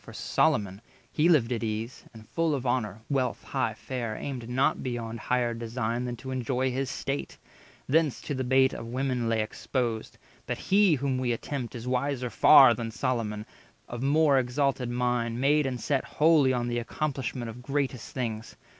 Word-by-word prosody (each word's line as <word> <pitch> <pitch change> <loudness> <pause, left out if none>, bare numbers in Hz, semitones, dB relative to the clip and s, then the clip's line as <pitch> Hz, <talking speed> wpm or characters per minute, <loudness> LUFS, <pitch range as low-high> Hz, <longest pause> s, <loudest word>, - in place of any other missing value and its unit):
200 - - -28
For - - -9
Solomon, 100 0 +1 0.3
he 160 +3 +3
lived 130 -8 +4
at 115 -2 -1
ease, 110 +3 -4
and, 110 -2 -14
full 165 -2 +1
Of 135 -2 -4
honour, 110 -4 -1
wealth, 130 -4 -1
high - - -1
fare, 120 -4 -4
aimed 125 -3 -5
not 130 +2 +1
beyond 115 -2 -4
Higher 120 0 0
design 115 +1 -3
than 120 -1 -3
to 130 +3 -8
enjoy 130 0 -1
his 130 +1 -2
state; 140 +1 -4 0.5
Thence 150 0 +2
to 145 - -4
the 130 -1 -2
bait 130 +1 +3
of 115 - -6
women 125 -1 -1
lay 110 -1 +1
exposed. 115 0 -3 0.3
But - - -2
he 195 -4 +4
whom 135 -1 -1
we 125 -2 0
attempt 125 +1 -5
is 120 +1 -7
wiser 130 -1 -1
far 135 -5 +8
Than 115 -1 -4
Solomon, 110 -2 -2 0.4
of 120 0 -6
more 140 0 +4
exalted 130 0 0
mind, 120 -1 -1
Made 145 +2 +3
and 125 -2 -3
set 140 0 0
wholly 150 -4 +4
on 120 -1 -1
the 120 0 -1
accomplishment 130 -2 -3
Of 120 +2 -11
greatest 135 -2 -2
things. 115 -3 -4
125 Hz, 180 wpm, -28 LUFS, 115-135 Hz, 0.5 s, far